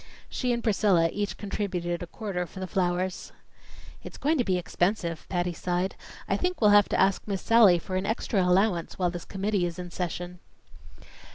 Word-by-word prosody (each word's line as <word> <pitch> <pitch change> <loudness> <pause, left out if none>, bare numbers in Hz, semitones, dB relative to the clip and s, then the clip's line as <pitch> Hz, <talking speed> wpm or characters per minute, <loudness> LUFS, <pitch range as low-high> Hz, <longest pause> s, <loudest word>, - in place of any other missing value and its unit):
She 250 -1 -1
and 235 -1 -1
Priscilla 195 -6 +3
each 205 -1 -3
contributed 180 -4 -3
a 175 - -5
quarter 180 -2 -4
for 190 - -11
the 190 - -3
flowers. 185 0 -1 0.7
"It's - - -10
going 305 +1 +1
to - - +3
be 185 -4 +1
expensive," 175 -1 -1
Patty 175 -1 -1
sighed. 180 +3 -2 0.3
"I - - +1
think 360 0 -1
we'll 210 -3 +5
have 205 -1 +6
to - - 0
ask 195 0 +3
Miss 195 -2 -3
Sallie 225 -6 +6
for 185 +2 -5
an 190 +1 -2
extra 220 -2 0
allowance 180 -1 +1
while 180 -2 +1
this 175 -1 -7
committee 195 -2 -1
is 170 - -7
in 180 -1 -7
session." 180 0 -4
185 Hz, 185 wpm, -27 LUFS, 175-205 Hz, 0.7 s, have